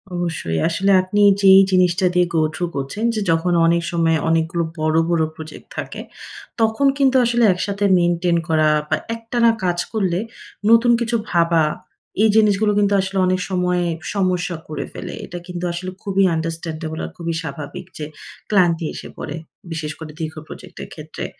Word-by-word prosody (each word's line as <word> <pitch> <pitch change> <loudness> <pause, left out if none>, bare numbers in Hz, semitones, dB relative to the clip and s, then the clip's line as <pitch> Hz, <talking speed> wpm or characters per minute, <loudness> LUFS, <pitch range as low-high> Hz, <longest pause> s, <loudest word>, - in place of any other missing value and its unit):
অবশ্যই। 160 - -2
আসলে 195 +4 +1
আপনি 205 +3 -1 0.2
যেই 195 0 +8
জিনিসটা 185 0 +3
দিয়ে 180 0 +3
গো 160 - +3
থ্রু 175 - -1
করছেন, 140 +11 -4
যে 215 - -1
যখন 170 +2 +1
অনেক 170 +1 +3
সময় 165 -1 +2
অনেকগুলো 165 +1 +1 0.2
বড়, 155 0 +1
বড় 165 -2 +2
প্রজেক্ট 160 0 -10
থাকে, - - -5 0.6
তখন 225 +5 +2
কিন্তু 265 -2 +3
আসলে 240 0 +2
একসাথে 200 +2 -2
মেইনটেইন 175 0 +1
করা, 155 -1 +3 0.2
বা - - +3 0.2
একটানা 230 +1 +1
কাজ 175 -1 0
করলে 185 -4 0 0.5
নতুন 230 +1 +6
কিছু 235 0 -1
ভাবা, 170 -2 +3 0.6
এই 220 - +5
জিনিসগুলো 210 -1 +3
কিন্তু 205 0 +2
আসলে 195 0 -4
অনেক 185 0 +1
সময় 180 -1 0 0.3
সমস্যা 185 -2 0
করে 150 -2 -4
ফেলে। 180 - -7
এটা 175 - -8
কিন্তু 180 0 -6
আসলে 185 +2 -5
খুবই 195 -1 +1
আন্ডারস্ট্যান্ডেবল 160 -1 -4
আর - - -8
খুবই 170 -1 -3
স্বাভাবিক 155 +1 -7
যে 150 - -4 0.4
ক্লান্তি 175 -5 +2
এসে - - -8
পড়ে। 145 - -5 0.4
বিশেষ 155 -2 -4
করে, 155 -1 -8
দীর্ঘ 160 -1 -4
প্রজেক্ট - - -12
এর - - -10
ক্ষেত্রে। - - -7
175 Hz, 165 wpm, -20 LUFS, 165-195 Hz, 0.6 s, যেই